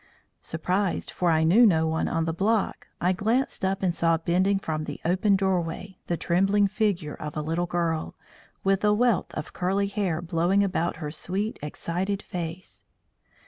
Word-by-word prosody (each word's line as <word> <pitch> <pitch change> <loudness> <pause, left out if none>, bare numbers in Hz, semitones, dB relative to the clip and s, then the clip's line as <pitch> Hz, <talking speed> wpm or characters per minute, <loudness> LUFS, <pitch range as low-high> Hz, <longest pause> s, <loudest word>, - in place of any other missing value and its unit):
Surprised, 180 +4 -1
for 180 - 0
I 160 -1 +3
knew 185 +10 +6
no 165 -8 +5
one 160 0 0
on 165 0 0
the 165 - -1
block, 205 +5 0
I 180 +2 +2
glanced 225 +5 0
up 195 +1 0
and 180 -2 +2
saw 165 -1 +2
bending 185 +4 +1
from 155 -5 -3
the - - -6
open 190 +4 +3
doorway 190 -1 -2
the 170 - -1
trembling 195 +5 +2
figure 195 -7 -1
of 150 0 -7
a - - 0
little 165 +3 -1
girl, 165 -2 -1 0.5
with 195 +1 +2
a 210 0 +4
wealth 240 -2 +2
of - - -5
curly 190 +2 0
hair 200 -5 -1
blowing 175 +3 +1
about 180 -3 -1
her 155 -2 -5
sweet, 195 +7 -3
excited 180 +6 -3
face. 175 0 -6
180 Hz, 170 wpm, -26 LUFS, 165-200 Hz, 0.5 s, knew